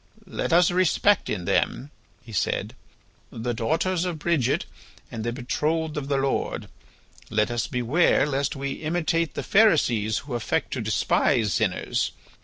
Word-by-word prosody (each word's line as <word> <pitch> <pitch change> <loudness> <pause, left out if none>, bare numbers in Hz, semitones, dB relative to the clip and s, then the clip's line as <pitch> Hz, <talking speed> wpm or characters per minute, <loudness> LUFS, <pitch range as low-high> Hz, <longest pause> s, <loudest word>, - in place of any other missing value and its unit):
"Let 185 - -3
us 175 +1 +5
respect 185 +2 +2
in 90 -4 -3
them," 135 - 0 0.3
he 115 - -12
said, 100 - -1 0.6
"the 120 +2 -3
daughters 165 +10 0
of 180 -3 -2
Bridget 155 -5 +1 0.5
and 115 -2 -5
the 120 - -1
betrothed 150 +5 -1
of 145 -2 -4
the 140 -1 +1
Lord. 135 0 -1 0.6
Let 105 +1 +1
us 120 -2 -1
beware 125 +9 +2
lest 140 -2 -1
we 140 0 -3
imitate 165 +1 -1
the - - -3
Pharisees 125 - +3
who 140 - -6
affect 120 -2 -1
to - - -2
despise 105 -6 +1
sinners. - - 0
140 Hz, 145 wpm, -25 LUFS, 120-165 Hz, 0.6 s, us